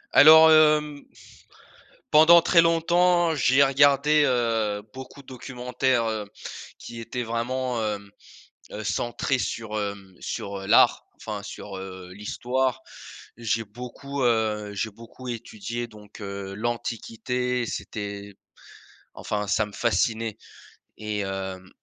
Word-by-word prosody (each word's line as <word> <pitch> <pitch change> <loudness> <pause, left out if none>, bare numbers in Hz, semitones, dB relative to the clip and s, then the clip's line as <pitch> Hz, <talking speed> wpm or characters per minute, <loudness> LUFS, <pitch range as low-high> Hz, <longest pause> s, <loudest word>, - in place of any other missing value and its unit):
Alors 160 +1 +9
hem, 150 -2 +4 1.1
pendant 165 +3 +7
très 170 - +5
longtemps, 170 +1 +3
j'ai 140 -1 +4
regardé, 145 +2 +4
heu, 115 -5 0
beaucoup 130 +2 -10
de - - -33
documentaires, 125 -1 -1
heu, 110 -2 -3 0.5
qui 115 - -9
étaient 120 +2 -4
vraiment 120 +1 -2
hem, 100 -2 -4 0.6
heu, - - -6
centrés 120 +3 -1
sur, 110 -3 -4
hem, 100 -2 -5
sur, 100 - -5
heu, 95 0 -8
l'art, - - +5
enfin 105 -2 -6
sur, 105 -1 -8
heu, 95 -1 -9
l'histoire. 125 +5 -2 0.6
J'ai 115 -1 -2
beaucoup, 125 +5 -6
heu, 110 -3 0
j'ai 100 +2 -2
beaucoup 115 +4 -13
étudié 120 0 -5
donc, 105 -1 -15
heu, 100 -1 -6
l'Antiquité, 120 +2 -2
c'était 100 -3 -6 0.8
enfin 105 0 -3
ça 105 +2 +1
me 105 - -13
fascinait. 115 -1 0 0.6
Et 105 -1 -4
hem, 95 -1 -5
115 Hz, 120 wpm, -25 LUFS, 105-130 Hz, 1.1 s, Alors